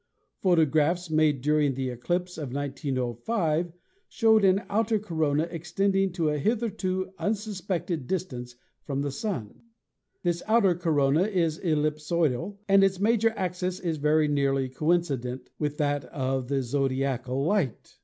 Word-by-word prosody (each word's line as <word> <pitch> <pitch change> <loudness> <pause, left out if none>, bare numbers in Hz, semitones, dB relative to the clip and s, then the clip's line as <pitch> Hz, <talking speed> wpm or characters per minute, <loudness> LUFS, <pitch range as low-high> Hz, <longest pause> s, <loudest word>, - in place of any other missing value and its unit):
Pho 185 -2 +3
tographs 160 +2 +2
made 155 -4 +3
during 150 -1 +2
the 130 -1 -2
eclipse 175 +9 -2
of 140 -5 -5
1905 145 - -1 0.4
showed 220 -2 +4
an 195 +1 +4
outer 220 +1 +1
corona 160 -7 0
extending 190 +4 0
to 165 -4 0
a 150 0 -1
hitherto 190 - -1
unsuspected 190 - -2
distance 125 -10 -4 0.3
from 140 0 -2
the 145 - -2
Sun. 135 - -4 0.6
This 175 -1 0
outer 215 -4 +4
corona 160 -1 +2
is 170 -6 0
ellipsoidal 155 +1 0
and 195 0 +6
its 190 -1 +2
major 225 +2 +3
axis 180 0 -2
is 165 -3 -2
very 150 +1 +3
nearly 135 -2 +1
coincident 130 -4 -1
with 150 -1 -2
that 145 -1 0
of 130 -1 -2
the 135 0 0
zodiacal 135 0 -1
light. 170 - -1
155 Hz, 135 wpm, -27 LUFS, 140-185 Hz, 0.6 s, and